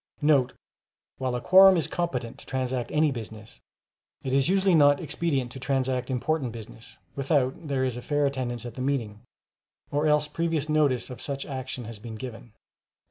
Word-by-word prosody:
* - - -42 1.0
[While 130 -1 -1
a 120 - -3
quorum 190 0 +7
is 165 - +1
competent 130 -10 -3
to - - -13
transact 130 -2 -2
any 150 -1 +3
business, 110 -3 -8 0.6
it 130 - -2
is 135 +3 +3
usually 190 0 +3
not 145 -3 +5
expedient 145 -6 -2
to 130 - -8
transact 130 -1 -1
important 130 -1 -1
business 115 +1 -11 0.2
without 140 +1 0
there 135 -2 0
is 125 -2 -2
a - - -6
fair 145 +2 0
attendance 125 -4 -3
at 120 - -6
the 125 - -7
meeting, 120 -6 -2 0.7
or 145 +2 +1
else 150 0 +3
previous 160 -1 -1
notice 145 -5 +1
of 125 - -8
such 140 -1 -3
action 130 -2 -5
has 110 -1 -9
been 110 +1 -8
given. 115 -1 -9
130 Hz, 175 wpm, -26 LUFS, 125-150 Hz, 1.0 s, quorum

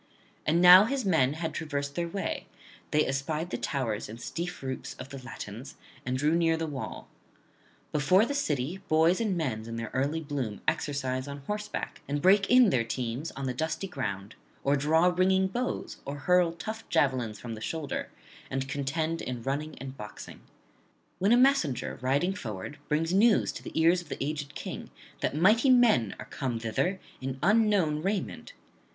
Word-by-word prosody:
And 165 +3 +3
now 180 +3 +10
his 260 0 -1
men 155 -8 +3
had 160 0 -4
traversed 140 -3 -3
their 170 +3 -2
way; 195 +4 -3 0.4
they 150 0 +3
espied 150 +5 -2
the - - -1
towers 115 -8 -2
and 115 +2 -8
steep 175 +4 -5
roofs 130 -1 -5
of 135 - -9
the 135 -1 -8
Latins, 120 0 -8 0.3
and 130 0 0
drew 150 +4 +2
near 165 -1 +3
the 165 - -2
wall. 145 -4 -6 0.8
Before 170 +8 +4
the 285 - -3
city 155 - -1
boys 160 +5 +4
and 205 -5 0
men 115 -9 -2
in 115 - -5
their 115 -1 -5
early 145 +5 0
[163 135 -9 -3
196]bloom - - -19
exercise 130 -2 -1
on 140 0 -6
horseback, 210 +3 -4
and 145 +1 -1
break 195 +5 +4
in 250 -5 +7
their 120 - +2
teams 125 +5 -3
on 140 - -5
the 130 - -1
dusty 160 +7 -2
ground, 105 - -4 0.3
or 140 +1 +3
draw 155 +4 +3
ringing 190 +1 +3
bows, 245 +7 -3
or 140 +1 -5
hurl 175 +4 +3
tough 220 +6 -7
javelins 125 -6 +1
from 115 0 -6
the 110 - -8
shoulder, 150 +4 -3 0.4
and 135 0 -2
contend 150 +4 -2
in 125 -2 -5
running 150 +4 -3
and 135 +1 -8
boxing: 105 -1 -9 0.8
when 195 +4 +3
a 240 - +7
messenger 250 - +2
riding 140 +9 +1
forward 120 - -6
brings 165 +3 +1
news 215 +3 +4
to - - -8
the - - -4
ears 170 +2 +4
of 175 - -16
the - - -4
aged 145 0 -4
King - - -6 0.3
that - - -1
mighty 215 - +4
men 235 - +4
are - - -8
come 130 -5 -3
thither 175 - -1 0.2
in 130 0 -4
unknown 205 -8 +3
raiment. 200 - -3
150 Hz, 180 wpm, -29 LUFS, 130-180 Hz, 0.8 s, now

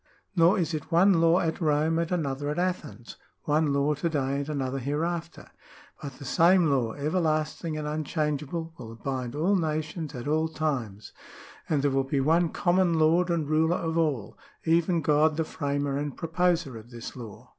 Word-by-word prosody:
Nor 175 +4 +5
is 170 -3 -1
it 155 +2 -5
one 175 +1 +5
law 165 +2 +5
at 165 +2 -2
Rome 155 +1 +2
and 170 +1 -2
another 145 -4 -1
at 150 - -3
Athens, 175 -9 -3 0.3
one 150 0 +1
law 140 +2 +2
to 160 +4 -2
day 140 -3 -1
and 140 +1 -4
another 135 -2 -2
hereafter; 165 +5 -3 0.5
but 140 -3 -6
the 140 - -11
same 170 +3 +4
law, 120 -5 +1
everlasting 155 0 -1
and 150 -1 -4
unchangeable, 155 +1 -2
will 115 -2 -8
bind 130 +1 -4
all 175 +7 +2
nations 155 -2 -2
at 125 +2 -6
all 155 +2 +1
times; 130 -11 -3 0.6
and 145 -3 +1
there 145 - +2
will 135 0 +1
be 135 +1 -1
one 165 +5 +3
common 175 -1 +2
lord 165 +3 +3
and 165 -4 0
ruler 160 +3 +2
of 165 -1 -3
all, 150 -10 -1 0.3
even 170 +1 +2
God 150 +1 +3
the 160 - +1
f 155 - -14
ramer 140 -1 0
and 145 -1 -4
proposer 165 -6 0
of 110 +2 -15
this 120 -2 -8
law." 115 -5 -10
155 Hz, 180 wpm, -27 LUFS, 140-165 Hz, 0.6 s, Nor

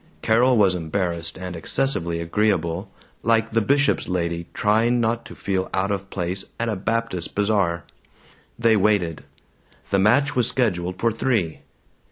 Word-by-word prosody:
Carol 120 +3 +4
was 100 -3 +4
embarrassed 85 -1 -3
and 90 -1 -6
excessively 85 -3 0
agreeable, 85 -1 0 0.3
like 115 0 +2
the 115 0 +2
bishop's 140 +5 +2
lady 85 -2 -2
trying 115 +4 +2
not 115 0 0
to - - -10
feel 95 -2 -2
out 95 +2 0
of 100 -1 -3
place 90 +1 -3 0.2
at 115 - -1
a 110 - -1
Baptist 110 -3 -2
bazaar. 100 -5 +1 0.7
They 115 -1 +4
waited. 95 -6 +1 0.7
The 100 - +3
match 140 +9 +3
was 125 - +3
scheduled 90 -7 0
for 115 - +2
three. 110 -8 -1
100 Hz, 145 wpm, -23 LUFS, 90-115 Hz, 0.7 s, Carol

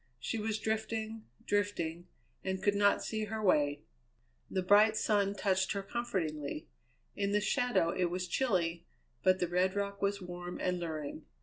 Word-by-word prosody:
She 225 - -2
was 215 0 -1
drifting, 220 0 -2 0.2
drifting, 175 -5 -1 0.4
and 190 0 -2
could 205 - +4
not 200 0 +3
see 220 -1 -2
her 220 +1 -4
way. 150 -7 +2 0.7
The 185 - -1
bright 210 +3 +6
sun 205 -2 +2
touched 190 -1 +1
her 200 -1 -3
comfortingly. 175 -11 -3 0.5
In 200 0 0
the 210 - +4
shadow 215 -4 +2
it 180 - +1
was 180 +1 -2
chilly; 175 -7 0 0.3
but 185 +3 +4
the 180 - 0
red 180 +2 +1
rock 200 0 -2
was 200 0 +1
warm 180 -1 -6
and 180 -1 0
luring. 155 -2 -5
195 Hz, 160 wpm, -33 LUFS, 175-210 Hz, 0.7 s, bright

